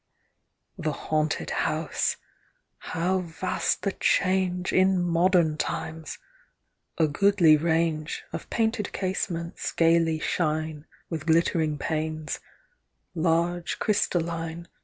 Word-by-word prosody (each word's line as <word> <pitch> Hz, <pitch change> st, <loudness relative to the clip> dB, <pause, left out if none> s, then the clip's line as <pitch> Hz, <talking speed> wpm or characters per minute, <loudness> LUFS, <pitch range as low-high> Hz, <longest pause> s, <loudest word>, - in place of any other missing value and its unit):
The 155 Hz, -3 st, -1 dB
Haunted 155 Hz, 0 st, -1 dB
House! -, -, 0 dB, 0.3 s
— -, -, -46 dB
how 185 Hz, +3 st, +1 dB
vast 180 Hz, +1 st, -2 dB
the 195 Hz, -, +1 dB
change 185 Hz, -1 st, +1 dB
In 185 Hz, 0 st, +4 dB
modem 175 Hz, -2 st, +3 dB
times! 160 Hz, -1 st, -4 dB, 0.8 s
A 160 Hz, -, +4 dB
goodly 175 Hz, 0 st, +5 dB
range 160 Hz, 0 st, 0 dB
Of -, -, -6 dB
painted 220 Hz, -2 st, 0 dB
casements 175 Hz, -3 st, -3 dB
gaily 165 Hz, -1 st, +3 dB
shine 155 Hz, -1 st, -2 dB, 0.2 s
With 160 Hz, -1 st, -4 dB
glittering 160 Hz, -2 st, +2 dB
panes; 155 Hz, 0 st, -3 dB, 0.7 s
large 170 Hz, +1 st, 0 dB
crystalline. 170 Hz, -4 st, -1 dB
165 Hz, 95 wpm, -26 LUFS, 160-180 Hz, 0.8 s, goodly